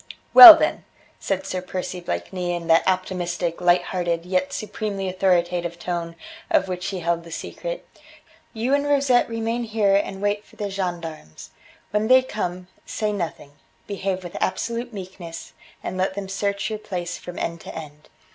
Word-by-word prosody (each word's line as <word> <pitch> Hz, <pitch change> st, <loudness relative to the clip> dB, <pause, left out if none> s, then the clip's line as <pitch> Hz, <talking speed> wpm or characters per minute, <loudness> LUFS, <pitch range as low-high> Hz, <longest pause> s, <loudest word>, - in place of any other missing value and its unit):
"Well, 340 Hz, -4 st, +14 dB
then," -, -, -1 dB, 0.4 s
said 195 Hz, -1 st, -2 dB
Sir 185 Hz, -, -3 dB
Percy 185 Hz, 0 st, -5 dB
Blakeney 175 Hz, -, -3 dB
in 170 Hz, -1 st, -5 dB
that 165 Hz, 0 st, +5 dB
optimistic, 180 Hz, -2 st, -2 dB
light 175 Hz, 0 st, +4 dB
hearted 175 Hz, -2 st, -2 dB
yet 185 Hz, +10 st, 0 dB
supremely 210 Hz, -4 st, -4 dB
authoritative 175 Hz, -2 st, 0 dB
tone 170 Hz, -1 st, -4 dB, 0.3 s
of 195 Hz, -, +2 dB
which 180 Hz, 0 st, -4 dB
he 190 Hz, -2 st, -4 dB
held 170 Hz, 0 st, -1 dB
the 170 Hz, -, -12 dB
secret, -, -, -6 dB, 0.6 s
"you 235 Hz, +4 st, -1 dB
and 285 Hz, 0 st, +1 dB
Rosette 275 Hz, -4 st, +3 dB
remain 230 Hz, +1 st, -2 dB
here 215 Hz, -3 st, +1 dB
and 195 Hz, -1 st, -1 dB
wait 205 Hz, +1 st, -1 dB
for -, -, -21 dB
the 205 Hz, -1 st, -4 dB
gendarmes. 170 Hz, -, -6 dB, 0.4 s
When 210 Hz, +1 st, 0 dB
they 255 Hz, +1 st, +6 dB
come, 180 Hz, -7 st, -4 dB, 0.2 s
say 215 Hz, -1 st, -2 dB
nothing; 170 Hz, -6 st, -5 dB, 0.3 s
behave 190 Hz, -2 st, -3 dB
with 175 Hz, -, -9 dB
absolute 235 Hz, +5 st, -2 dB
meekness, 185 Hz, -4 st, -9 dB, 0.3 s
and 185 Hz, -, -4 dB
let 190 Hz, +1 st, 0 dB
them 200 Hz, -1 st, -5 dB
search 200 Hz, +1 st, -2 dB
your 215 Hz, -, -4 dB
place 180 Hz, -4 st, -5 dB
from 175 Hz, 0 st, -9 dB
end 170 Hz, -1 st, -4 dB
to -, -, -10 dB
end. 150 Hz, -1 st, -10 dB
185 Hz, 165 wpm, -23 LUFS, 175-210 Hz, 0.6 s, Well